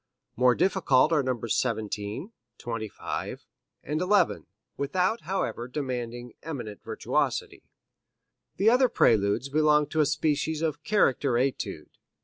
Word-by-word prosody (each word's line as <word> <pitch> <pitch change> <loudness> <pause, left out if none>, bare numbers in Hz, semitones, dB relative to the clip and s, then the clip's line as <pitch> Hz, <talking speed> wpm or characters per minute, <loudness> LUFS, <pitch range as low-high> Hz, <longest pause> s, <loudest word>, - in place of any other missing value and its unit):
More 125 0 +4
difficult 165 -6 +3
are 150 - +4
Nos. 120 -4 -2
17, 110 - -2 0.3
25 115 -3 -5 0.4
and 150 +3 -2
11, 200 +3 +2 0.3
without, 185 +10 0
however, 180 -10 -2
demanding 125 -3 -4
eminent 120 -10 -6
virtuosity. - - -2 0.9
The 215 +3 +4
other 255 +1 +4
Preludes 110 - +2
belong 150 0 +3
to 160 - -2
a 150 - +3
species 150 +1 0
of 155 -1 -2
character 135 - +2
etude. 115 - -2
140 Hz, 115 wpm, -27 LUFS, 120-160 Hz, 0.9 s, More